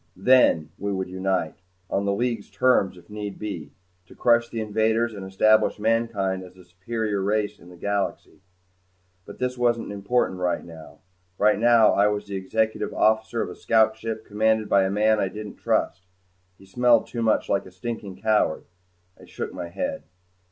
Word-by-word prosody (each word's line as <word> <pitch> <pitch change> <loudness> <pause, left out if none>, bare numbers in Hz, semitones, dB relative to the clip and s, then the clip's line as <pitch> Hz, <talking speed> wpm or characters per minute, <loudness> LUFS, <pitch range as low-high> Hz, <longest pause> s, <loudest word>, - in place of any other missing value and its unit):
Then 95 -7 +4
we 100 +1 -2
would 95 -1 -3
unite 95 -3 -2 0.3
on 100 +1 -1
the 100 - +1
League's 115 0 -2
terms 100 -3 +2
if 90 - -17
need 105 -1 -6
be 90 -9 -6 0.4
to - - -16
crush 120 -1 +3
the 115 - -5
invaders 110 +2 0
and 100 -2 -8
establish 110 +3 +3
mankind 105 -4 0
as 90 0 -14
the 90 - -16
supreme 100 +3 -3
race 105 +1 -1
in 85 - -15
the 90 - -14
galaxy. 100 +1 -3 0.9
But - - -10
this 125 0 -3
wasn't 120 -3 +1
important 100 -1 -1
right 90 -1 -1
now. 80 -2 -13 0.4
Right 105 0 +3
now 115 -1 +5
I 100 +1 +4
was 105 0 -2
the 100 -1 -6
Executive 110 +4 -1
Officer 110 +1 +2
of - - -6
a - - -9
scout 110 -1 +3
ship 110 0 -5
commanded 110 +1 +1
by 100 -1 +3
a - - 0
man 105 +2 +2
I 100 - +1
didn't 105 +1 -8
trust. 95 0 -1 0.5
He 95 - -17
smelled 120 +5 +3
too 120 - -5
much 110 -1 +1
like 100 - 0
a - - -13
stinking 100 -1 -7
coward. 110 -7 +2 0.6
I - - -14
shook - - -6
my 85 - -5
head. 275 - -3
105 Hz, 180 wpm, -24 LUFS, 95-110 Hz, 0.9 s, now